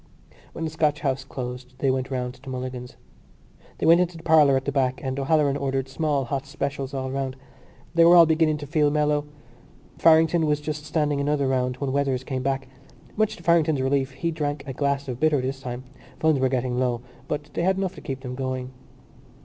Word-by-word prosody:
When - - -5
the 160 - -2
Scotch 150 -1 0
House 135 -2 -1
closed 125 -1 -7
they 135 - +2
went 130 0 -2
round 125 -2 -3
to 130 +1 -12
Mulligan's. 125 -1 -6 0.8
They - - -2
went 170 +2 +7
into 175 -1 -1
the 165 - -12
parlour 150 -4 +5
at 130 - -4
the 140 - -1
back 130 -2 0
and 130 0 -2
O'Halloran 140 0 +2
ordered 135 -1 -1
small 145 0 0
hot 135 +2 -3
specials 140 -2 -3
all 130 -1 -3
round. 135 -1 -3 0.6
They 170 0 +5
were 170 +1 +7
all 170 -1 +9
beginning 155 -1 +2
to 150 - -7
feel 150 0 +2
mellow. 150 0 +1 0.7
Farrington 160 0 +5
was 150 0 +1
just 150 0 -5
standing 150 -2 0
another 140 -1 +1
round 125 -1 0
when 140 -1 -2
Weathers 135 -2 0
came 130 0 -3
back. 135 0 -1 0.5
Much 215 0 +1
to - - -15
Farrington's 160 -4 +3
relief 135 0 +1
he 165 +6 -2
drank 145 -3 -3
a 135 - -5
glass 140 +1 -1
of 125 -2 -5
bitter 155 -1 +3
this 135 +1 -3
time. 125 -1 -5 0.4
Funds 160 -3 +3
were 130 0 +2
getting 125 -1 -1
low 125 -2 0 0.3
but 150 0 -4
they - - -1
had 190 +2 +2
enough 190 -1 -1
to 155 - -11
keep 135 -1 -5
them 125 -1 -6
going. 130 -1 -4
140 Hz, 205 wpm, -25 LUFS, 130-155 Hz, 0.8 s, all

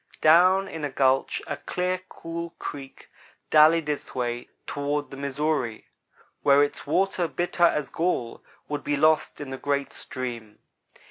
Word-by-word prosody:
Down 185 +5 +6
in 160 -4 -7
a 145 - -1
gulch 135 0 +1
a - - -4
clear, 180 0 -2
cool 170 0 -6
creek 135 -2 -8 0.4
dallied 155 +1 +6
its 150 -1 -4
way 120 -1 -3 0.2
toward 145 +1 -2
the - - -7
Missouri, 140 -4 -2 0.6
where 140 0 +5
its 145 - -4
water, 185 +2 +1
bitter 175 +2 +1
as 150 -3 +1
gall, 160 -9 -2 0.2
would 145 -1 -4
be 145 - 0
lost 155 +1 +2
in 145 -2 -6
the 130 - -5
great 140 -1 -1
stream. 120 -5 -6
145 Hz, 145 wpm, -26 LUFS, 135-165 Hz, 0.6 s, Down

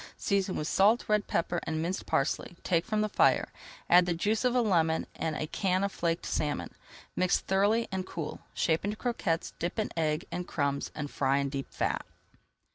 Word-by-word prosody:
Season 195 -2 0
with 150 - -2
salt, 210 +7 +4
red 210 -1 +2
pepper, 170 +1 0
and 160 0 -3
minced 175 +4 -3
parsley, 155 +5 0
take 170 +1 +1
from 215 -1 +1
the 215 - +2
fire, - - +3 0.4
add 175 0 +6
the 175 - +1
juice 210 +7 0
of 250 -1 +2
a 250 - +4
lemon 165 -7 +2
and 160 -1 -2
a 155 - -2
can 185 +3 0
of 200 - 0
flaked 170 -2 -1
salmon. 150 -1 -2 0.4
Mix 185 -1 +3
thoroughly 205 +4 +2
and 190 -1 -2
cool. 165 -4 -5 0.2
Shape 160 -1 +1
into 205 +2 -2
croquettes, 195 -10 -1
dip 175 +5 -2
in 215 - -1
egg 155 -1 0
and 180 0 -4
crumbs, 140 -2 -1
and 145 -1 -4
fry 135 0 +1
in 140 0 0
deep 135 -1 -5
fat. - - -1
175 Hz, 195 wpm, -30 LUFS, 160-200 Hz, 0.4 s, add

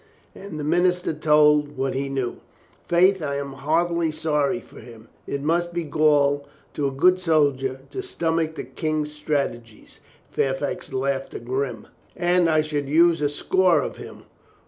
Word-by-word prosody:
And 195 -6 -8
the - - -4
minister 180 +2 +1
told 150 -1 +3
what 135 0 -1
he 135 +1 -2
knew. 135 -3 -3 0.5
"Faith, 185 +2 +4
I 140 -2 -2
am 140 -1 -4
heartily 165 +4 0
sorry 155 +2 0
for - - -15
him. 115 -2 -14 0.2
It 140 0 -3
must 170 +3 0
be 170 - -1
gall 145 -2 +2 0.3
to 145 -2 -1
a - - -2
good 180 +7 +3
soldier 140 -6 +1
to 390 - -4
stomach 165 - -1
the - - -5
King's 155 -2 -3
strate 145 -5 -1
gies." 115 -2 -17 0.3
Fairfax 135 +2 -2
laughed 135 -2 -3
grim. 125 -3 -3 0.3
"And 175 -1 +2
I 155 -1 +3
could 145 -2 -3
use 165 +1 +4
a 145 - +2
score 180 +4 +2
of - - -6
him. - - -11
150 Hz, 160 wpm, -23 LUFS, 140-170 Hz, 0.5 s, Faith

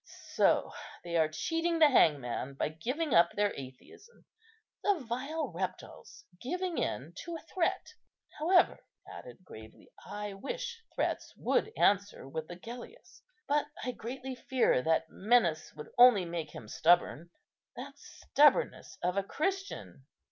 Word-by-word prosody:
So - - +3 0.3
they 170 -1 -4
are 160 -2 +3
cheating 330 - -1
the 310 -3 +6
hangman 140 - +2
by 140 - -1
giving 255 - -3
up 170 0 +5
their 205 0 +1
atheism, 135 - -12 0.6
the 410 - +3
vile 265 +4 -3
reptiles, 185 +1 -6 0.2
giving 360 +6 -2
in 150 +7 -3
to 340 -1 -6
a 325 - -7
threat. 360 +4 -1 0.5
However," 355 +4 +4 0.3
he - - -12
added - - -11
gravely, - - -13
"I 205 -1 -6
wish 485 - -5
threats - - -2
would 440 - +1
answer 200 -7 +2
with 155 +3 -5
Agellius; 235 - -10 0.3
but 295 +1 +1 0.2
I 255 - -1
greatly 260 +3 -6
fear 250 - +1
that 160 +2 +1
menace 195 -7 +2
would 150 - -10
only 240 -7 +8
make 170 -2 -4
him 110 - -9
stubborn. 170 +4 +2 0.5
That - - -9
stubbornness 295 - +2
of 180 +2 0
a 200 - +2
Christian! 385 - -4
230 Hz, 135 wpm, -31 LUFS, -, 0.6 s, only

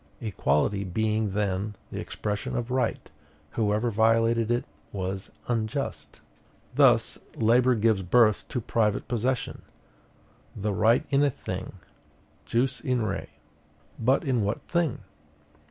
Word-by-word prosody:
Equality 100 - 0
being 110 +2 0
then 100 0 -1 0.2
the - - -4
expression 105 -1 -3
of 120 +1 -3
right, 130 0 0 0.4
whoever 110 +1 +1
violated 115 +1 +3
it 120 +1 +1 0.3
was 95 0 -4 0.2
UNJUST. 110 - -3 0.5
Thus, - - +4 0.2
labor 120 +3 +4
gives 110 -2 +2
birth 110 +3 +3
to 125 - -2
private 105 -1 0
possession; 125 +1 -1 0.9
the 105 0 -2
right 115 - +3
in 140 +1 +4
a 145 - +4
thing 95 -7 -6 0.7
jus 125 - +1
in 125 -5 0
re. 100 -2 -3 0.7
But 130 +7 +2
in 130 -6 +1
what 105 +1 -2
thing? 170 -10 -1
110 Hz, 120 wpm, -27 LUFS, 105-120 Hz, 0.9 s, Thus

